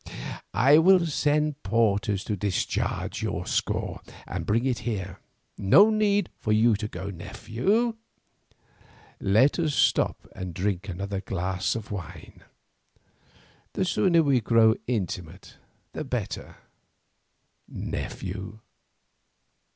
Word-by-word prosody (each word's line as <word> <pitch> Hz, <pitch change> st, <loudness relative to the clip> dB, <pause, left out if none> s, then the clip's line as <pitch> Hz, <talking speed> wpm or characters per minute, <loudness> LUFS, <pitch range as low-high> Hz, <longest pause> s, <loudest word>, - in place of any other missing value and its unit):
I 145 Hz, +4 st, +6 dB
will 180 Hz, +1 st, +5 dB
send 150 Hz, -1 st, 0 dB
porters 100 Hz, -2 st, +1 dB
to 105 Hz, -, -2 dB
discharge 100 Hz, 0 st, -2 dB
your -, -, -3 dB
score -, -, -2 dB, 0.2 s
and -, -, -5 dB
bring 115 Hz, +4 st, +1 dB
it 130 Hz, -3 st, 0 dB
here. 95 Hz, -6 st, -4 dB, 0.4 s
No 170 Hz, -, +6 dB
need 205 Hz, -1 st, +1 dB
for 110 Hz, -, -2 dB
you 110 Hz, +1 st, +4 dB
to 105 Hz, 0 st, -4 dB
go, 95 Hz, 0 st, -6 dB
nephew, 115 Hz, -, -1 dB, 1.2 s
let 110 Hz, -, +3 dB
us 155 Hz, -4 st, 0 dB
stop -, -, +1 dB
and 90 Hz, -3 st, -6 dB
drink 100 Hz, +1 st, -2 dB
another 95 Hz, +2 st, -4 dB
glass 95 Hz, -1 st, -2 dB
of 110 Hz, -2 st, -6 dB
wine; 95 Hz, -7 st, -8 dB, 1.3 s
the 190 Hz, -, 0 dB
sooner 170 Hz, -2 st, +3 dB
we 135 Hz, -4 st, +3 dB
grow 110 Hz, -1 st, +5 dB
intimate 90 Hz, -6 st, -4 dB, 0.4 s
the -, -, -4 dB
better, -, -, -4 dB, 1.1 s
nephew." 95 Hz, +3 st, -5 dB
110 Hz, 110 wpm, -26 LUFS, 95-150 Hz, 1.3 s, I